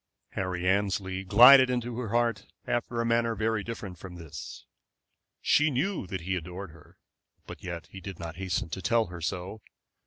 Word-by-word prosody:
Harry 90 Hz, -1 st, -3 dB
Annesley 95 Hz, -1 st, 0 dB
glided 125 Hz, +7 st, +8 dB
into 120 Hz, -1 st, -2 dB
her 120 Hz, -4 st, -4 dB
heart 115 Hz, -2 st, 0 dB, 0.2 s
after 120 Hz, 0 st, -2 dB
a 115 Hz, -, +1 dB
manner 115 Hz, 0 st, +1 dB
very 110 Hz, 0 st, 0 dB
different 105 Hz, -6 st, -7 dB
from 90 Hz, -2 st, -9 dB
this. 80 Hz, -4 st, -9 dB, 0.8 s
She 150 Hz, +1 st, +4 dB
knew 150 Hz, -, -1 dB
that 95 Hz, -1 st, -4 dB
he 95 Hz, +3 st, -2 dB
adored 90 Hz, +1 st, -6 dB
her, 75 Hz, -1 st, -18 dB, 0.5 s
but -, -, -10 dB
yet 85 Hz, -2 st, -5 dB
he 95 Hz, -, -9 dB
did 95 Hz, -1 st, -7 dB
not 85 Hz, 0 st, -7 dB
hasten 95 Hz, -3 st, -2 dB
to 95 Hz, -, -5 dB
tell 115 Hz, +4 st, +2 dB
her 85 Hz, -, -7 dB
so. 90 Hz, +6 st, -4 dB
100 Hz, 175 wpm, -28 LUFS, 90-115 Hz, 0.8 s, glided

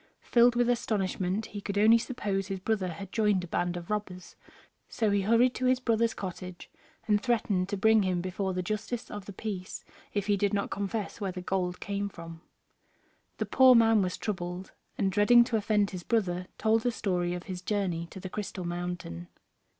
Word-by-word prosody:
Filled 240 Hz, 0 st, +4 dB
with 240 Hz, 0 st, +2 dB
astonishment, 205 Hz, -4 st, -1 dB
he 205 Hz, -, -7 dB
could 200 Hz, 0 st, -4 dB
only 220 Hz, +3 st, +6 dB
suppose 210 Hz, -6 st, -2 dB
his 195 Hz, -1 st, -4 dB
brother 200 Hz, -1 st, -1 dB
had 180 Hz, +3 st, -7 dB
joined 210 Hz, -4 st, +2 dB
a -, -, -6 dB
band 175 Hz, +1 st, -1 dB
of 175 Hz, +3 st, -7 dB
robbers: 185 Hz, -4 st, -4 dB, 0.5 s
so 220 Hz, -3 st, 0 dB
he 200 Hz, 0 st, +2 dB
hurried 230 Hz, +5 st, +4 dB
to 255 Hz, -, -2 dB
his 255 Hz, 0 st, +3 dB
brother's 230 Hz, -2 st, +1 dB
cottage, 180 Hz, -1 st, -7 dB, 0.4 s
and 210 Hz, -1 st, +3 dB
threatened 215 Hz, -7 st, 0 dB
to 205 Hz, -, -2 dB
bring 220 Hz, +2 st, +5 dB
him 185 Hz, -2 st, 0 dB
before 185 Hz, +2 st, -2 dB
the 185 Hz, -, -1 dB
justice 215 Hz, +4 st, -4 dB
of 205 Hz, -2 st, -7 dB
the 200 Hz, -, -7 dB
peace 190 Hz, -2 st, -6 dB, 0.3 s
if 205 Hz, -2 st, -1 dB
he 205 Hz, -, +2 dB
did 205 Hz, +1 st, +1 dB
not 200 Hz, -, -2 dB
confess 205 Hz, +2 st, -3 dB
where 195 Hz, -2 st, -1 dB
the 180 Hz, -, -6 dB
gold 180 Hz, -1 st, -2 dB
came 200 Hz, +1 st, -3 dB
from. 165 Hz, -3 st, -10 dB, 1.0 s
The -, -, -1 dB
poor 260 Hz, -2 st, +6 dB
man 225 Hz, -2 st, +5 dB
was 180 Hz, -1 st, -2 dB
troubled, 180 Hz, -2 st, -4 dB, 0.3 s
and, 195 Hz, -2 st, +1 dB
dreading 215 Hz, +5 st, +6 dB
to 240 Hz, -1 st, -2 dB
offend 210 Hz, -1 st, +1 dB
his 185 Hz, -2 st, -6 dB
brother, 180 Hz, -4 st, -1 dB
told 220 Hz, +1 st, +2 dB
the 245 Hz, -, 0 dB
story 180 Hz, -5 st, -1 dB
of 180 Hz, -, -6 dB
his 185 Hz, -2 st, -6 dB
journey 180 Hz, -4 st, -1 dB
to 190 Hz, -, -9 dB
the 185 Hz, -, -6 dB
Crystal 190 Hz, -2 st, -5 dB
Mountain. 175 Hz, -, -5 dB
200 Hz, 195 wpm, -29 LUFS, 180-220 Hz, 1.0 s, only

